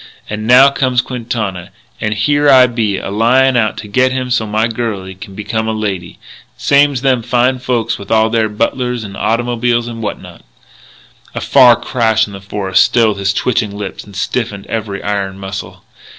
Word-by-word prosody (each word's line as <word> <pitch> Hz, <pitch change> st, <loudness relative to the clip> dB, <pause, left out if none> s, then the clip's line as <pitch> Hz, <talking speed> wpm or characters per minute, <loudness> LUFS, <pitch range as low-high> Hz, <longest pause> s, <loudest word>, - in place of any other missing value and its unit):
And 110 Hz, +1 st, -5 dB
now 130 Hz, +3 st, +7 dB
comes 130 Hz, -3 st, 0 dB
Quintana, 115 Hz, -8 st, -4 dB, 0.3 s
and 110 Hz, 0 st, -1 dB
here 145 Hz, +7 st, +2 dB
I 130 Hz, -2 st, +7 dB
be 115 Hz, -5 st, -1 dB
a -, -, -5 dB
lyin' 125 Hz, +5 st, +3 dB
out 110 Hz, -3 st, +1 dB
to 105 Hz, -, -7 dB
get 130 Hz, +5 st, +2 dB
him 130 Hz, -1 st, -3 dB
so's 110 Hz, -3 st, 0 dB
my 110 Hz, +2 st, +1 dB
girlie 110 Hz, -5 st, -4 dB
can 95 Hz, +1 st, -11 dB
become 110 Hz, +2 st, -3 dB
a 110 Hz, -, -1 dB
lady, 100 Hz, -5 st, -4 dB, 0.4 s
same's 140 Hz, -2 st, +2 dB
them 130 Hz, -3 st, +2 dB
fine 125 Hz, +2 st, +1 dB
folks 120 Hz, -3 st, -1 dB
with 100 Hz, -, -10 dB
all 110 Hz, 0 st, +3 dB
their 110 Hz, -1 st, +1 dB
butlers 120 Hz, +2 st, -2 dB
and 100 Hz, -2 st, -8 dB
automobiles 120 Hz, +1 st, 0 dB
and 115 Hz, -1 st, -7 dB
what 105 Hz, -, -4 dB
not -, -, -13 dB, 0.5 s
" -, -, -27 dB
A -, -, -2 dB
far 120 Hz, -2 st, +6 dB
crash 110 Hz, -3 st, +1 dB
in 100 Hz, -, -11 dB
the 100 Hz, -, -9 dB
forest 100 Hz, -1 st, +1 dB
stilled 110 Hz, -4 st, +2 dB
his 100 Hz, 0 st, +1 dB
twitching 105 Hz, -2 st, -1 dB
lips 100 Hz, -2 st, -6 dB
and 100 Hz, -1 st, -15 dB
stiffened 100 Hz, 0 st, -3 dB
every 105 Hz, -3 st, -4 dB
iron 100 Hz, -2 st, -2 dB
muscle. 95 Hz, 0 st, -7 dB
115 Hz, 185 wpm, -15 LUFS, 100-125 Hz, 0.5 s, now